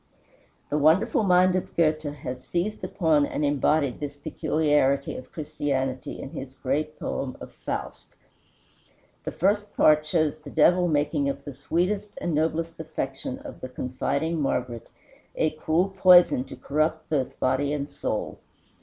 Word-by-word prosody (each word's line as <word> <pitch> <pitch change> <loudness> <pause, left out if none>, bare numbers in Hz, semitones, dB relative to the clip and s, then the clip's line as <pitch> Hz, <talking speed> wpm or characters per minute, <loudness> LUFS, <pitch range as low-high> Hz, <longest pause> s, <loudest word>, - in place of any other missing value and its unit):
The 150 - +1
wonderful 170 +11 +4
mind 185 -2 +4
of 185 - -3
Goethe 155 -2 +2
has 135 -4 -6
seized 185 +5 -2
upon 155 -5 +2
and 150 - -1
embodied 145 -1 +1
this 145 -1 -5
peculiarity 145 -2 +1
of 130 - -9
Christianity 140 -4 -3
in 135 - -7
his 135 0 -7
great 150 +4 -2
poem 130 -2 -3
of - - -9
"Faust." - - -6 1.2
The - - -2
first 205 +3 0
part 155 0 +5
shows 155 -1 0
the 150 -2 -11
Devil 175 +4 +4
making 145 -2 +1
of 140 0 -5
the 145 - -6
sweetest 180 +9 -1
and 175 - -2
noblest 165 +2 -1
affection 160 - -4
of 285 - -9
the 130 - -6
confiding 140 +6 -2
Margaret 125 -4 -2 0.5
a 155 - +1
cruel 160 +4 0
poison 180 -8 +6
to 135 - -9
corrupt 155 +2 -1
both 135 -4 -1
body 130 +2 +1
and 145 -1 -2
soul. - - -4
150 Hz, 145 wpm, -26 LUFS, 140-170 Hz, 1.2 s, poison